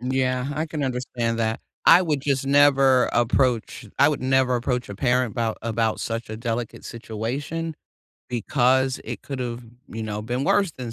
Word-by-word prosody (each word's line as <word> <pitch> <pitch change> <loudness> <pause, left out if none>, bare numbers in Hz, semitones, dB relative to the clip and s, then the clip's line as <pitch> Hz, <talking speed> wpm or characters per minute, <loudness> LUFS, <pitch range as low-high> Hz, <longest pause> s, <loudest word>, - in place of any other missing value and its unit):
Yeah, 130 +1 -1
I 155 +2 -2
can 155 -1 -4
understand 125 -2 -2
that, 110 0 -1 0.3
I 180 - +8
would 150 -6 0
just 135 -1 -1
never 135 -2 +5
approach 120 -1 +1
I 140 - +6
would 150 - -1
never 130 -1 +2
approach 125 0 -2
a 100 - -6
parent 125 +1 +1
about 115 -2 -1
about 115 -1 -1
such 115 0 -4
a 110 - -5
delicate 115 0 -4
situation, 130 +9 -4 0.5
because 130 +2 +1
it - - -6
could've, 125 -3 -5 0.2
you 115 - -6
now, 105 -1 -4
been 125 +5 -2
worse 195 +3 +2
than 125 -4 -7
125 Hz, 165 wpm, -24 LUFS, 115-135 Hz, 0.5 s, I